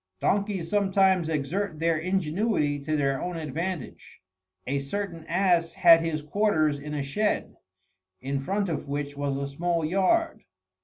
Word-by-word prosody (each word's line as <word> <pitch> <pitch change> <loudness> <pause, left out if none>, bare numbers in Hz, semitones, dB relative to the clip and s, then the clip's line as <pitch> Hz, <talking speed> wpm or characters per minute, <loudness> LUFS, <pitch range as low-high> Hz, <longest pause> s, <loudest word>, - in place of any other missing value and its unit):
Donkeys 200 - 0
sometimes 190 -3 +2
exert 160 +4 -2
their 165 +1 +1
ingenuity 170 -2 0
to 155 +2 -2
their 135 -2 0
own 180 -1 -3
advantage. 160 +1 -5 0.5
A 140 +2 -1
certain 170 +3 -5
ass 175 -4 +2
had 170 -3 +7
his 160 -2 -2
quarters 155 -4 +1
in 150 +1 -6
a 145 - -2
shed, 205 +10 -1 0.6
in 135 +1 -2
front 195 +8 -1
of 155 -4 -4
which 145 0 -3
was 140 -1 -2
a 140 0 -3
small 165 +3 -1
yard. 195 - +1
165 Hz, 145 wpm, -26 LUFS, 145-190 Hz, 0.6 s, had